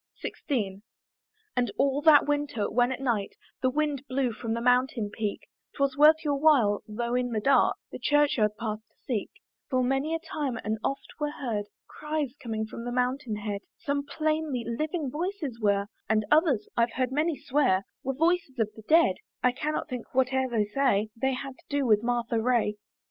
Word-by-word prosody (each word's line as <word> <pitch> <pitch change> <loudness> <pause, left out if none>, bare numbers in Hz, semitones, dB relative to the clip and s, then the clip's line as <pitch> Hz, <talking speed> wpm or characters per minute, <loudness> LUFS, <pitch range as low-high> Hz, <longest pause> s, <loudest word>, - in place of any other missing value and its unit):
XVI. 205 -9 -3 0.7
And 245 -4 +1
all 275 +1 +2
that 300 -2 +7
winter, 290 -7 0
when 245 +3 +2
at 260 - -3
night 235 -7 -1 0.3
The 255 - +3
wind 290 -1 -1
blew 255 -1 0
from 225 0 -3
the - - -2
mountain 245 -3 +2
peak, 215 -2 -3 0.3
'Twas 275 -1 +1
worth 310 +2 +6
your 290 -1 +1
while, 260 -10 +4
though 235 +3 -3
in 250 0 +1
the 220 - +1
dark, 265 +3 +4 0.2
The - - -7
church 290 +3 +3
yard 210 -1 +1
path 215 -2 -3
to - - -40
seek: 225 -6 -2 0.4
For 255 -2 +2
many 270 +5 0
a - - -2
time 300 -6 -3
and 215 +1 -2
oft 275 - -3
were 295 -1 0
heard 230 -8 -3 0.2
Cries 300 -4 -3
coming 220 -2 -3
from 225 +1 -8
the 245 - -4
mountain 250 -1 -1
head, 205 -1 -4 0.2
Some 280 0 -2
plainly 310 -4 -1
living 295 +4 -2
voices 315 - -3
were, 200 -1 +2 0.2
And 215 -1 +2
others, 300 - +3
I've 235 0 +2
heard 255 -1 0
many 305 +2 +1
swear, 255 -9 +1 0.2
Were 270 -1 -2
voices 325 -3 +1
of 220 -2 0
the 220 - -11
dead: 260 - +4 0.3
I 250 - +5
cannot 300 +5 -2
think, 250 -5 -6
whate'er 260 0 +2
they 225 -3 +1
say, 215 -2 +1
They 265 +3 0
had 270 +1 -7
to - - -23
do 285 -1 0
with 215 -3 +4
Martha 235 -1 0
Ray. 230 -3 +1
255 Hz, 185 wpm, -28 LUFS, 225-290 Hz, 0.7 s, that